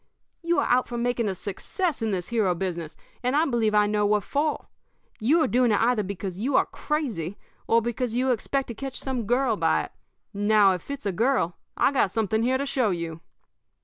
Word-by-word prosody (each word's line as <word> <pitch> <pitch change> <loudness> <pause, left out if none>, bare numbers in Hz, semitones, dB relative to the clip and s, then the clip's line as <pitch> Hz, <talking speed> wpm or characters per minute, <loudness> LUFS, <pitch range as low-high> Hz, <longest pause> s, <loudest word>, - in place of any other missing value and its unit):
You 340 0 +1
are - - +2
out 250 +1 +3
for 240 - -5
making 240 -1 0
a 190 - -3
success 240 - -3
in 225 - 0
this 180 -3 -3
hero 215 -7 +1
business, 170 -3 -4 0.2
and 250 +2 0
I 310 +2 +4
believe 230 -6 +1
I 210 0 +5
know 210 0 +1
what 205 0 +2
for. 295 +2 -1 0.5
You 300 +9 +3
are - - +2
doing 245 -1 +3
it 205 - +3
either 230 -1 +2
because 190 -1 -5
you 260 +5 0
are - - +5
crazy 220 - -3 0.3
or 230 0 +3
because 240 0 -2
you 255 +1 +2
expect 265 +3 -1
to - - -3
catch 270 +3 -6
some 250 -5 -3
girl 245 -2 +2
by - - +2
it. - - -9 0.4
Now, 205 0 +4
if 180 +6 -7
it's 280 -5 -5
a 200 - +1
girl, 215 -4 +1 0.2
I've 280 - +3
got 250 -7 +3
something 220 +2 0
here 255 +3 +2
to 280 - -2
show 260 -5 +1
you.' 170 -3 -4
230 Hz, 215 wpm, -25 LUFS, 200-260 Hz, 0.5 s, I